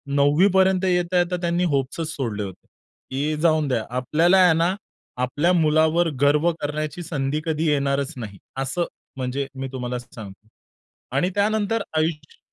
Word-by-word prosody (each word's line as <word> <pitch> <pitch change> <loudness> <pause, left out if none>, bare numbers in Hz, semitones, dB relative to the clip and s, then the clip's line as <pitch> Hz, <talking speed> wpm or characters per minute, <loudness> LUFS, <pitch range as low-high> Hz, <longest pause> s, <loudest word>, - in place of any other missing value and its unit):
9वीपर्यंत 185 +6 +4
येता-येता 180 0 +1
त्यांनी 170 +1 0
होप्सच 140 +4 -1
सोडले 110 -6 -3
होते. 95 -2 -9 0.4
की 145 +3 -1
जाऊन 155 -3 +3
द्या. 120 -4 0
आपल्याला 165 +8 +3
आहे 180 -3 +6
ना, 170 +3 +2 0.5
आपल्या 145 +8 +1
मुलावर 160 +1 +3
गर्व 150 +4 +4
करण्याची 155 +3 -3
संधी 145 -1 -2
कधी 160 0 -1
येणारच 140 -1 0
नाही. 105 -5 -7 0.2
असं 135 +6 -1 0.3
म्हणजे 130 +2 -2
मी 135 - -3
तुम्हाला 125 -1 -4
सांगतो. 110 -3 -12 0.7
आणि 180 +6 +2
त्यानंतर 215 +1 +1 0.2
आयुष्य 155 -1 -2
155 Hz, 135 wpm, -23 LUFS, 135-175 Hz, 0.7 s, आहे